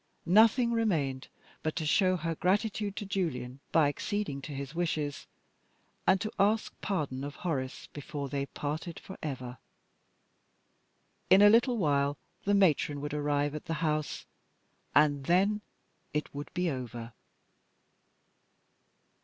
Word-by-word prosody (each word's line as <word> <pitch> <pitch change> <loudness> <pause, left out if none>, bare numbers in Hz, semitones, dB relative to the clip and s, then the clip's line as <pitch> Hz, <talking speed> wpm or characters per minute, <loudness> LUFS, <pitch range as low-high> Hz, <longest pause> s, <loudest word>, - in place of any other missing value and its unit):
Nothing 225 +6 +5
remained 160 - 0 0.3
but 155 - -2
to 160 - -2
show 185 +3 +3
her 165 0 -2
gratitude 200 +3 0
to 205 - -4
Julian 140 -10 -2
by 160 -3 +5
acceding 145 0 -2
to 145 - -7
his 140 +1 -5
wishes, 155 -4 -2 0.8
and 190 0 +5
to 215 - -2
ask 215 +2 +2
pardon 145 -9 -2
of 145 0 -5
Horace 135 -7 -3
before 145 -1 -5
they 140 +1 -2
parted 155 +5 -4
forever. 130 -9 -6 1.7
In 195 +2 +8
a 205 - +9
little 240 +2 +4
while 145 -5 +1 0.3
the 205 0 +3
Matron 155 -6 +3
would 145 0 -4
arrive 145 -1 0
at 150 - -6
the 165 -1 -2
house 155 -1 -1 0.7
and 145 -2 +4
then 195 +6 +3 0.5
it 150 - -2
would 145 +1 -6
be 180 0 +1
over. 120 -3 -6
155 Hz, 130 wpm, -30 LUFS, 140-195 Hz, 1.7 s, a